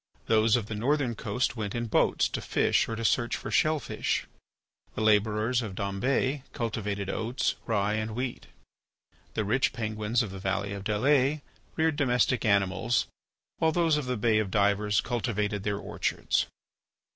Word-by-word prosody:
Those 110 0 +4
of 120 -4 0
the 105 - -6
northern 130 +3 +1
coast 115 +3 -1
went 105 -2 -4
in 120 0 -1
boats 110 - +2
to - - -4
fish - - +1
or 115 - -2
to 115 0 -4
search 120 +2 +2
for - - -6
shell 155 0 +3
fish. - - -2 0.7
The - - -2
labourers 110 +3 +2
of 105 -5 -6
Dombes 130 +9 0
cultivated 105 -4 -3
oats, 115 +6 -1
rye, 105 -2 +1
and 110 0 -2
wheat. 125 0 -4 0.9
The 110 - 0
rich 130 +7 +1
Penguins 110 +1 -1
of 105 - -6
the 95 - -7
valley 100 +1 -2
of 100 -1 -6
Dalles 135 +7 +2 0.3
reared 160 -2 +1
domestic 125 -3 +2
animals, 100 +3 +2 0.5
while 160 - +3
those 165 -2 +2
of 150 -2 -1
the 125 -1 -1
Bay 110 0 +3
of 105 -3 -1
Divers 105 +1 +2
cultivated 105 -4 -1
their 100 0 -1
orchards. - - -1
110 Hz, 160 wpm, -28 LUFS, 105-125 Hz, 0.9 s, Those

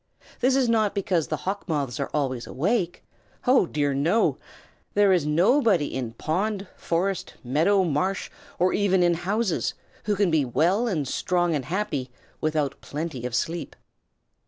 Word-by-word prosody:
This 255 +1 +3
is 265 -2 +3
not 220 -3 +2
because 180 -5 0
the - - -2
Hawk 195 0 -3
Moths 140 -6 -1
are 140 - -2
always 130 -5 -2
awake. 175 - -1 0.4
Oh 250 -7 +4
dear, 145 -3 0
no! 165 +11 +2 0.6
There 205 -2 +5
is 170 -5 +1
nobody 185 - +3
in 125 -4 -3
pond, 195 - -1
forest, 180 +2 -2
meadow, 165 +10 +3
marsh, 185 +4 -1 0.3
or 180 +1 +2
even 190 -3 +3
in 175 0 +4
houses, 190 +3 -1 0.3
who 210 - +1
can 195 -3 +2
be 155 -3 +3
well 170 - +2
and 155 - -1
strong 175 +4 0
and 140 -4 -2
happy 150 -7 -2 0.3
without 155 -3 -1
plenty 145 -5 -4
of 125 - -4
sleep. 165 +7 -2
175 Hz, 155 wpm, -25 LUFS, 145-200 Hz, 0.6 s, There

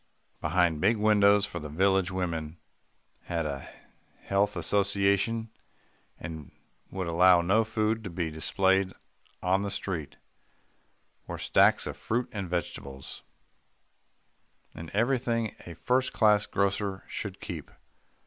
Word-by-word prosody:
Behind 85 -4 +1
big 110 +4 +3
windows 105 -1 +4
for - - -6
the 75 - -7
village 95 +3 +2
women 85 -4 -3 0.7
had 85 -2 -2
a 70 -2 -5 0.5
health 100 +1 +1
association 100 +4 +1 0.7
and 80 -2 -8 0.4
would 95 -1 -4
allow 90 +1 +5
no 100 +6 +3
food 110 0 -1
to 100 - -5
be 85 -2 -3
displayed 95 +4 +1 0.5
on 95 +2 +2
the 100 - -2
street 85 -6 -4 1.1
were - - -5
stacks - - +4
of - - -4
fruit 120 +2 -1
and 100 -4 -5
vegetables, 70 -6 -5 1.5
and 80 0 -8
everything 115 -1 0
a 85 - -8
first 125 +10 0
class 105 -2 +4
grocer 100 0 -1
should - - -6
keep. - - -7
95 Hz, 120 wpm, -28 LUFS, 85-105 Hz, 1.5 s, allow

